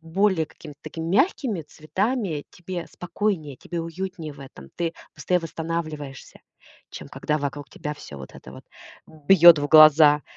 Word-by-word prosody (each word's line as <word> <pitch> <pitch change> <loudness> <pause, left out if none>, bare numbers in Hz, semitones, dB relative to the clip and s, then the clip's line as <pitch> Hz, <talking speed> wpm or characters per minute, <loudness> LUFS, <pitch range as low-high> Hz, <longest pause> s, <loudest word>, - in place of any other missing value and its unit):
более 175 +1 +1
какими-то 150 -2 -14
такими 165 -1 -6
мягкими 225 - +1
цветами, 180 - -3
тебе 175 0 -7
спокойнее, 175 -6 -3
тебе 170 +6 -6
уютнее 165 -1 -6
в 140 - -15
этом. 70 - -13
Ты 170 -1 -2 0.2
быстрее 180 - 0
восстанавливаешься, 160 -4 -6 0.5
чем - - -9
когда 150 0 -2
вокруг 145 0 -5
тебя 150 0 -6
всё 75 - -11
вот 65 - -11
это 65 - -12
вот 65 - -13 0.4
бьет 160 +1 +6
в 145 - -1
глаза. 155 -1 +7
160 Hz, 145 wpm, -24 LUFS, 150-180 Hz, 0.5 s, глаза